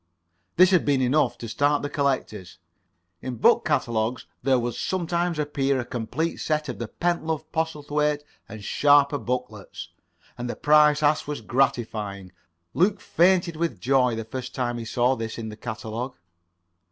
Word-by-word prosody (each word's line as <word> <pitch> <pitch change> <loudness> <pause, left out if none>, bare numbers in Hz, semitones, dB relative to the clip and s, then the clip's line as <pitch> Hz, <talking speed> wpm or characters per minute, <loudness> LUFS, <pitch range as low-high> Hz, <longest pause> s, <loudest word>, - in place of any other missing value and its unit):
This 185 +1 +6
had 180 -3 +4
been 140 -2 +2
enough 130 +4 +2
to 115 - -7
start 145 +5 +1
the - - -1
collectors. 125 -10 -2 0.6
In 130 -1 -4
book 235 - +4
catalogues 120 -5 -1 0.2
there 135 -1 +3
would 120 -1 -2
sometimes 175 -2 -1
appear 140 -2 0
a 120 - -3
complete 125 +8 -3
set 155 0 -1
of - - -5
the 120 - -4
Pentlove, 160 +1 -2
Postlethwaite 150 -2 -1 0.3
and 110 -1 -9
Sharper 145 +3 +4
booklets. 125 -5 -5 0.5
[Pg 120 - -6
14]And - - -3
the - - -4
price 150 0 +4
asked 150 0 +2
was 150 -4 -4
gratifying. 110 -6 -1 0.4
Luke 195 +3 +2
fainted 175 -1 +2
with 155 - -2
joy 125 0 +2
the 115 0 -5
first 125 +2 -6
time 120 -2 -2
he 115 - -6
saw 125 +3 +1
this 115 -2 -5
in 110 -1 -5
the 105 - -8
catalogue. 115 +2 -5
135 Hz, 160 wpm, -25 LUFS, 120-150 Hz, 0.6 s, This